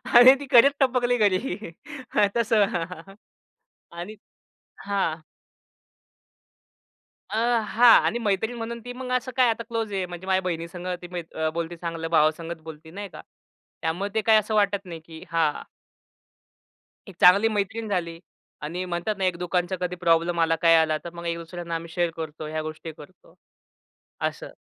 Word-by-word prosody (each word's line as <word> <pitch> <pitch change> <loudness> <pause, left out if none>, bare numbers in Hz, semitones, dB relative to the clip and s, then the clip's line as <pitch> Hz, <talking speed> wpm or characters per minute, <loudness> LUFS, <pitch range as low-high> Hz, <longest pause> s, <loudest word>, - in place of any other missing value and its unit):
आणि 250 +3 +10
ती 285 - -6
खरंच 270 +3 +7
टपकली 245 -2 +2
घरी. 205 0 0 0.7
तस 235 0 +1
आणि 195 -1 -2 1.5
हां. 185 -5 -1 2.1
अ, - - -4 0.3
हां, 235 +3 +7
आणि 240 - 0
मैत्रीण 220 +2 -1
म्हणून 235 +1 -5
ती 245 - -6
मग 250 0 -6
असं 255 +1 -6
काय 250 -2 +5
आता 230 +1 -1
क्लोज 225 -3 -4
आहे, 190 -1 -1
म्हणजे 175 +1 -9
माझ्या 190 0 +2
बहिणीसंग, 175 0 -5 0.2
ती 175 - -8
म्हणजे 175 -3 -7
अ, 155 - +2
बोलती, 170 +1 -4
ती 165 - -20
चांगलं 165 -1 -4
भावासंगच 165 +1 +1
बोलते 160 0 -11
नाही 200 +1 -7
का - - -11 0.6
त्यामुळे 175 +5 -2
ते 220 - +1
काय 220 0 +5
असं 215 +1 -3
वाटत 200 -1 +1
नाही 165 -2 -8
की 160 -1 -11
हा 160 -3 +1 1.5
एक 185 - -13
चांगली 200 +5 +7
मैत्रीण 215 +2 -2
झाली 170 -4 -2 0.4
आणि 175 +5 -3
म्हणतात 180 +5 -2
ना, 190 - -3
एक 180 -2 0
दुकानचा 180 +1 -1
कधी 180 0 -2
प्रॉब्लेम 170 0 +2
आला, 165 0 +3
काय 165 -1 +6
आला. 155 -1 +3
तर 170 - -7
मग 170 0 -8
एक 170 0 -1
दुसऱ्यांना 170 0 -6
आम्ही 165 0 -5
शेअर 175 -1 +1
करतो, 155 -1 -6
ह्या 155 0 -3
गोष्टी 155 +1 -7
करतो. 155 +5 -16 0.9
असं. - - -3
180 Hz, 160 wpm, -25 LUFS, 165-215 Hz, 2.1 s, आणि